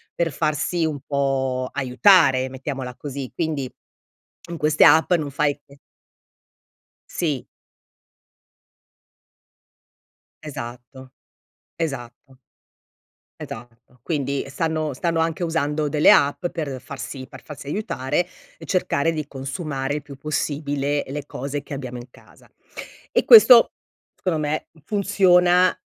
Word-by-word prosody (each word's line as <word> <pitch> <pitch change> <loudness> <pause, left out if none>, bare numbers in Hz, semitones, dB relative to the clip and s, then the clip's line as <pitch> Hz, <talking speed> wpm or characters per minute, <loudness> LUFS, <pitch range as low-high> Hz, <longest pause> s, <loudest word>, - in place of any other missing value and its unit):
per 170 -1 0
farsi 155 +3 0
un 155 -2 -2
po' 135 -2 -1
aiutare, 135 - +4
mettiamola 130 -1 -6
così, 140 -2 -6
quindi 155 -6 -2 0.8
in 170 - -5
queste 155 0 +3
app 160 +3 +5
non 155 -5 0
fai 145 +1 0
e 140 0 -18 1.3
Sì. 150 -7 -2 3.0
Esatto, 130 -2 -9 0.6
esatto. 135 -4 -6 1.0
Esatto, 120 +2 -11
quindi 140 -4 -2
stanno 155 +1 -2
stanno 165 +5 -1
anche 165 +1 -1
usando 155 -2 -1
delle 150 +1 +5
app 145 +5 +3
per 145 -7 -5
farsi 130 0 -8
per - - -13
farsi 150 -2 -10
aiutare 150 -2 -1 0.3
e - - -12
cercare 165 -4 0
di 155 -2 -4
consumare 135 0 -4
il 150 - -5
più 140 -1 -11
possibile 145 0 -2
le 140 +1 -5
cose 140 +1 -5
che - - -7
abbiamo 130 -3 -6
in 120 +1 -11
casa. - - -20 0.6
E - - +1
questo, 255 - +9 0.5
secondo 175 -4 0
me 155 0 -2 0.2
funziona 185 -2 +3
145 Hz, 110 wpm, -22 LUFS, 135-160 Hz, 3.0 s, questo